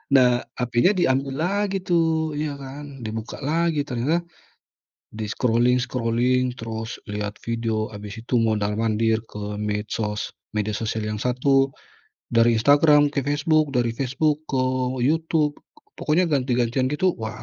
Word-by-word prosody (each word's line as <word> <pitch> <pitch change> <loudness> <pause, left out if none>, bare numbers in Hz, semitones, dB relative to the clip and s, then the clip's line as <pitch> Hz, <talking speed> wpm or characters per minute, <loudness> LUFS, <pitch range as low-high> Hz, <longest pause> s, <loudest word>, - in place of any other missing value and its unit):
Nah, 125 -2 +5 0.2
hapenya 125 - +2
diambil 135 -5 +1
lagi 200 +1 0
tuh, 160 -3 +1
ya 150 -1 -2
kan. 135 -1 -9
Dibuka 110 0 -5
lagi 160 0 +1
ternyata 145 +7 0 0.9
di-scrolling-scrolling 125 +2 +1
terus 115 +1 -5
lihat 105 0 -4
video 115 -2 -1
habis 105 +1 -8
itu 120 +2 0
mondar-mandir 110 0 +1
ke 105 0 -5
medsos, 105 0 -3 0.2
media 105 0 -1
sosial 110 0 -2
yang 105 0 -3
satu 135 +3 +2 0.6
dari 115 0 +4
Instagram 145 +4 +5
ke 140 - 0
Facebook, 150 0 +2
dari 120 -1 +2
Facebook 140 +4 0
ke 130 -2 +1 0.4
YouTube, 155 +1 +1 0.4
pokoknya 160 +4 +2
ganti-gantian 125 -2 +1
gitu 175 +6 +1
wah, 110 +2 -5
125 Hz, 120 wpm, -23 LUFS, 110-145 Hz, 0.9 s, Nah